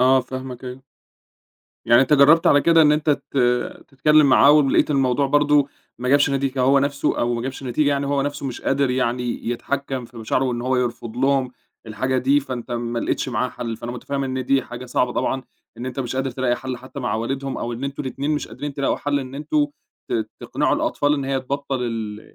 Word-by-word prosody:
آه، 130 +1 +5
فاهمك، 130 -1 -7
أيوه. 125 +1 -8 1.0
يعني 120 +2 +6
أنت 135 - 0
جرّبت 150 +3 +6
على 145 - +6
كده 165 +1 +5
إن 150 -1 +5
أنت 150 0 +1
ت 140 -1 -3 0.5
تتكلّم 150 +2 +4
معاه 140 +1 +6
ولقيت 150 0 +4
الموضوع 135 -1 +2
برضه 145 0 +3 0.3
ما 125 +1 -3
جابش 145 +2 +4
نتيجة 135 -1 -1
هو 135 +2 +4
نَفسه 140 +1 0
أو 120 0 +1
ما 115 - -3
جابش 130 +2 -5
نتيجة، 135 +4 +1
يعني 140 -1 0
هو 140 0 +1
نَفسه 145 0 -3
مش 125 - -5
قادر 135 -1 +1
يعني 125 -2 -1
يتحكّم 135 +1 -3
في 120 +1 -15
مشاعره 115 +3 0
وإن 125 -2 -1
هو 130 +1 +1
يرفُض 120 -2 -3
لهم 135 -1 +1 0.3
الحاجة 130 +5 -1
دي، 135 +3 +3
فأنت 130 -3 -6
ما 120 0 -2
لقيتش - - -1
معاه 125 0 -1
حَل، 115 -2 -5
فأنا 120 +2 -6
متفهِّم 135 +3 -3
إن 130 -1 -3
دي 135 +1 +2
حاجة 120 +1 -9
صعبة 125 0 0
طبعًا 130 +1 -1 0.3
إن 120 +3 -6
أنت 130 +1 -4
مش 130 0 -4
قادر 135 0 -1
تلاقي 125 -1 0
حَل 130 0 -5
حتى 130 +3 -9
مع 120 - -1
والِدهم 135 +4 -3
أو 120 - -3
إن 120 +3 -5
أنتم 140 +1 -4
الإتنين 140 +2 -3
مش 150 -1 -1
قادرين 140 +6 -6
تلاقوا 140 -1 0
حَل 145 0 -1
إن 130 0 -8
أنتم 290 - 0 0.4
ت - - -1
تقنِعوا - - 0
الأطفال 220 - +1
إن 140 -2 -3
هي 135 0 -1
تبطّل 135 0 -3
ال 110 -3 -4
130 Hz, 210 wpm, -22 LUFS, 125-140 Hz, 1.0 s, يعني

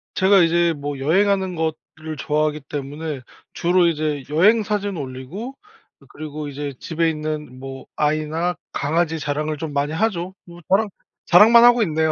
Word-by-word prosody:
제가 190 0 +5
이제 170 0 +3
뭐 145 -2 -5
여행하는 190 +5 +2
것 160 -1 -1 0.2
를 155 0 -6
좋아하기 150 +1 0
때문에 145 0 -5 0.3
주로 175 0 +3
이제 155 -3 -1
여행 200 +9 +4
사진 205 -2 -2
올리고 145 - -7 0.4
그 - - -20
그리고 155 -1 -7
이제 145 -1 -5
집에 165 0 0
있는 155 -4 -5
뭐 135 0 -9
아이나 155 +3 0 0.2
강아지 160 +3 0
자랑을 150 +1 -2
좀 150 0 -5
많이 145 +2 -1
하죠. 190 -1 -1
뭐 175 0 -13
자랑, 205 +3 +3 0.4
자랑만 225 +6 +7
하고 240 0 +6
있네요. 160 -5 +1
160 Hz, 320 characters per minute, -21 LUFS, 150-180 Hz, 0.4 s, 자랑만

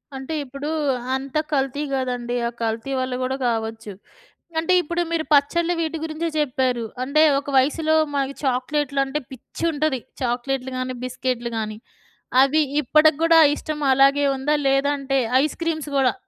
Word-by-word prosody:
అంటే 265 +4 -6
ఇప్పుడు 275 +3 -6 0.5
అంత 270 +2 -4 0.2
కల్తీ 275 +1 0
గాదండి. 245 -2 -2
ఆ - - -1
కల్తీ 225 +4 -2
వల్ల 255 0 -2
కూడా 260 +1 -1
గావచ్చు. 225 -2 -3 0.7
అంటే 325 +3 +1
ఇప్పుడు 345 +2 -2
మీరు 320 -1 0
పచ్చళ్ళు 340 +5 +2
వీటి 325 0 -2
గురించే 320 +1 -3
జెప్పారు. 255 -4 0 0.2
అంటే 280 +4 +2 0.2
ఒక 280 0 -7
వయసులో 315 +4 +2 0.2
మనకి 275 0 -1
చాక్లెటులు 275 +2 0
అంటే 270 +2 -3
పిచ్చుంటది. 295 +1 -2 0.2
చాక్లెటులు 255 +2 -2
గాని, 255 0 -3
బిస్కెటులు 250 -1 -3
గాని. 215 0 -4 0.6
అవి 285 +3 +4 0.2
ఇప్పడి 305 +4 +5
గూడా 330 0 +5
ఆ - - +7
ఇష్టం 300 -1 -5
అలాగే 275 +2 +4
ఉందా? 290 +3 0
లేదంటే 275 0 +1 0.3
ఐస్ 305 - -2
క్రీమ్స్ 315 -3 -2
గూడా. 265 -2 +3
275 Hz, 145 wpm, -22 LUFS, 255-305 Hz, 0.7 s, ఆ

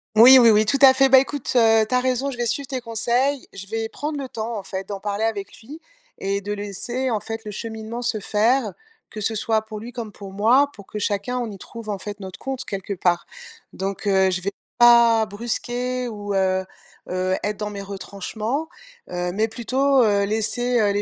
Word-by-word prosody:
Oui, 245 +4 +10
oui, 235 -3 +7
oui, 215 0 +4
tout 275 - +3
à 265 -1 +10
fait, 270 +1 +4
bah, 265 - +8
écoute, 275 +1 0
heu, 225 -2 +5
tu 255 - +1
as - - +4
raison, 255 +2 0
je 260 - -6
vais 240 - -1
suivre 275 +4 -2
tes 260 -1 -4
conseils, 245 +4 0
je 195 0 -9
vais 225 +2 -3
prendre 295 +3 -4
le 270 -2 -5
temps, 225 0 -4
en - - -6
fait, 190 0 -6
d'en 200 -1 -5
parler 205 +1 -3
avec 205 -3 -3
lui 290 +8 -11 0.4
et 200 +1 -1
de 205 +1 -4
laisser, 210 +6 -3
en 220 -3 0
fait, 225 +1 -6
le - - -5
cheminement 220 +2 -6
se 235 -3 -1
faire. 220 +3 +1 0.4
Que 215 - -7
ce 220 - 0
soit 220 0 0
pour 220 -1 -8
lui 230 +3 -8
comme 230 -3 -6
pour 200 -1 -10
moi, 235 +8 +4
pour 200 - -13
que 210 - -6
chacun 205 +5 -1
on 240 -2 -3
y 200 - -8
trouve, 230 +3 -10
en 205 - -2
fait, 205 +1 -7
notre 190 -2 -8
compte, 265 -1 -4
quelque 195 0 -4
part. 175 -2 +1 0.5
Donc, 195 +2 -4
heu, 190 -1 +3
je 180 -1 -1
vais 200 +2 -2 0.3
pas 235 -2 +6
brusquer 245 +4 -3
ou, 205 -3 -4
heu 190 -1 +1 0.5
heu, 185 +1 0
être 210 0 -2
dans 210 -1 -4
mes 200 -1 -6
retranchements, 210 - -4 0.4
heu, 180 0 -2
mais 215 +4 +1
plutôt, 260 +4 +2
heu, 200 -2 +2
laisser, 230 +4 0
heu, 205 -2 +3
les 205 0 0
220 Hz, 220 wpm, -22 LUFS, 200-245 Hz, 0.5 s, Oui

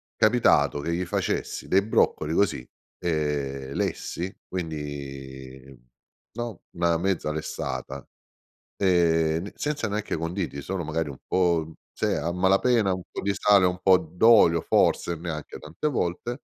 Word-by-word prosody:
capitato 105 -11 +3
che 85 +4 -2
gli 90 +1 -2
facessi 85 - -2
dei 95 +1 +3
broccoli 80 -7 +1
così, 85 -9 +1 0.3
ehm, 70 -5 -2
lessi, 90 +5 -3
quindi, 70 -5 -7 0.6
no, 120 -4 -5
una 85 -1 +1
mezza 90 -3 -1
lessata, 70 -3 -5 0.7
ehm, 85 -3 +2
ne 100 - -7
senza 145 -7 -2
neanche 105 +1 -2
conditi, 85 -3 -3
solo 90 +2 -4
magari 80 0 -2
un 65 - -9
po', 85 -3 +2
mhmm, 80 - -12 0.2
se - - -1
è, - - 0
a 85 - -1
malapena 95 +4 +3
un 90 -1 -5
po' - - -5
di 100 0 0
sale, 100 -1 +4
un 90 0 +1
po' 95 -1 +7
d'olio 90 -1 +4
forse, 85 - +2
neanche 80 -3 -6
tante 80 - -4
volte. 120 +3 -3
85 Hz, 140 wpm, -26 LUFS, 75-95 Hz, 0.7 s, po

